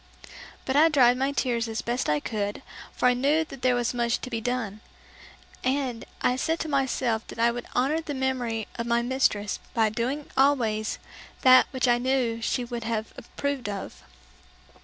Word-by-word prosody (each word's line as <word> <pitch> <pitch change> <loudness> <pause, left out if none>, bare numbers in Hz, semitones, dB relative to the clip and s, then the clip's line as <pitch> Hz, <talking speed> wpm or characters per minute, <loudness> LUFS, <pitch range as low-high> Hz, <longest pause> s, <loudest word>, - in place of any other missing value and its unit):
But 265 - -1
I 315 +3 +6
dried 250 -5 +5
my 270 +2 0
tears 240 -4 0
as 225 0 -4
best 240 -5 -1
I 150 0 +2
could, 205 +3 -3 0.3
for - - -2
I 250 - +5
knew 290 +6 +2
there 255 -4 0
was 245 0 0
much 235 -1 0
to 255 - -7
be 230 -1 -2
done; 225 -4 -3 0.8
and 255 -3 -1 0.2
I 250 - +2
said 320 +5 0
to - - -3
myself 260 -5 0
that - - -10
I 235 +1 +3
would 240 0 -6
honor 285 +6 +2
the 300 -3 -5
memory 250 -4 -1
of 235 - -2
my 235 0 +2
mistress 240 -5 0 0.2
by 220 -2 +3
doing 250 +7 -2
always 235 -6 +2 0.5
that 255 0 +7
which 260 -1 0
I 240 0 +4
knew 245 -3 0
she 245 +2 -1
would 235 -1 -5
have 225 -1 -3
approved 275 -2 -4
of. 200 -1 -6
245 Hz, 180 wpm, -26 LUFS, 230-265 Hz, 0.8 s, that